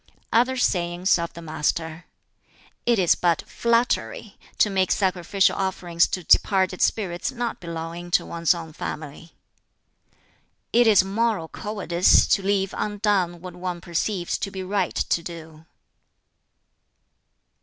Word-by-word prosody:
Other 250 +3 +3
sayings 175 -4 +1
of 170 0 -4
the 170 - -10
Master: 160 +1 -2 0.8
"It 240 -1 +4
is 180 -3 +4
but 170 -2 0
flattery 230 - 0 0.2
to 210 - +3
make 190 -1 +1
sacrificial 190 0 +1
offerings 180 -3 0
to 180 - -4
departed 190 +1 +3
spirits 180 -5 0
not 240 -1 -4
belonging 170 +1 -6
to - - -10
one's 170 +1 +1
own 165 -2 -8
family. 155 +2 -7 1.4
"It 240 0 +5
is 205 -4 +6
moral 200 -3 -1
cowardice 190 -4 +2
to 195 - +3
leave 195 0 0
undone 200 -5 0
what 180 -1 -8
one 180 -1 -4
perceives 175 +1 -2
to - - -3
be 190 -1 -6
right 190 -1 -1
to 170 - 0
do." 160 -2 -10
180 Hz, 125 wpm, -24 LUFS, 170-200 Hz, 1.4 s, is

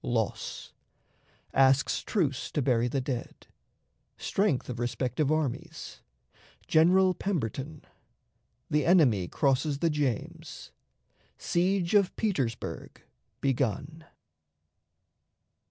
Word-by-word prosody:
Loss. 115 -3 -3 0.8
Asks 135 +1 +3
Truce 145 - -1
to 145 - 0
bury 120 -2 +2
the 135 +3 -1
Dead. 130 -2 -5 0.7
Strength 195 -10 0
of 120 -2 -5
Respective 125 +4 -1
Armies. 155 -5 -3 0.7
General 185 +4 +5
Pemberton. 150 - -3 0.9
The 150 0 +2
Enemy 135 - +4
crosses 140 - +1
the 165 +2 +1
James. 140 -7 -3 0.7
Siege 180 +1 0
of 200 -3 +3
Petersburg 135 - -3 0.4
begun. 140 +4 -1
140 Hz, 85 wpm, -28 LUFS, 125-170 Hz, 0.9 s, General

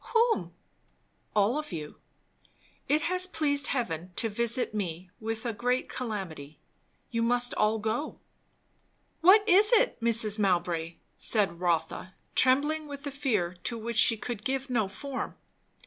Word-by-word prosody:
"Whom?" 455 0 +2 0.8
"All 215 +7 +2
of 300 - -7
you! 155 -4 -7 0.9
It 305 +2 +2
has 365 +1 +4
pleased 290 -5 +1
heaven 180 - -3
to 225 - -1
visit 235 +2 0
me 180 -3 -5
with 225 +1 -5
a 235 - -2
great 245 +4 -1
calamity. 185 - -6 0.5
You 230 -1 -1
must 245 +1 +2
all 215 +1 +1
go." 225 +7 -3 1.0
"What 405 +5 +6
is 410 +5 +7
it, - - +3
Mrs. 225 -2 +2
Mowbray?" 175 -4 0 0.2
said 195 -6 0
Rotha, 175 +1 -2 0.2
trembling 295 +4 +2
with 285 0 -8
a 285 - -4
fear 215 -11 -1
to 235 - -2
which 230 +1 -5
she 225 +1 +7
could 215 -1 -6
give 270 +1 -3
no 220 -5 +1
form. 270 +6 -6
230 Hz, 140 wpm, -28 LUFS, 195-280 Hz, 1.0 s, is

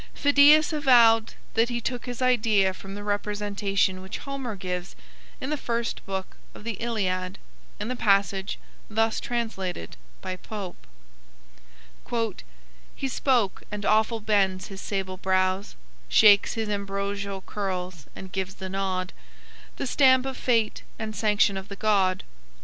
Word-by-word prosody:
Phidias 290 +3 +6
avowed 235 -6 +5 0.2
that 225 +2 +3
he 240 -1 -1
took 245 +1 -4
his 245 +1 -3
idea 215 -6 +3
from 195 +1 -9
the 205 - -7
representation 205 -2 -1
which 190 +3 -6
Homer 275 -5 -5
gives 180 -1 -5 0.4
in 265 - -4
the 300 - 0
first 235 -3 -2
book 190 -1 -4 0.2
of - - -11
the 230 +1 -2
"Iliad," 190 -5 -1 0.4
in 210 - -3
the 255 - -2
passage 195 -3 +1 0.3
thus 225 +1 +1
translated 195 - -4 0.2
by 185 0 -5
Pope: 195 - -8 2.1
"He 270 - -2
spoke 250 -6 +1
and 205 -1 -5
awful 220 +1 +2
bends 195 -3 +1
his 195 0 -8
sable 190 -2 -3
brows, 185 +1 0 0.3
Shakes 205 - +6
his 225 -1 -2
ambrosial 200 -1 -3
curls 185 -6 -4
and 190 -1 -9
gives 190 0 -3
the 190 -1 -6
nod, 185 -1 -2 0.6
The - - -3
stamp 260 0 +4
of 265 -1 -3
fate 230 -4 +1 0.2
and 215 -1 -5
sanction 210 -2 +2
of 190 0 -6
the 200 - -7
god. 195 -3 +2
205 Hz, 140 wpm, -26 LUFS, 190-230 Hz, 2.1 s, Phidias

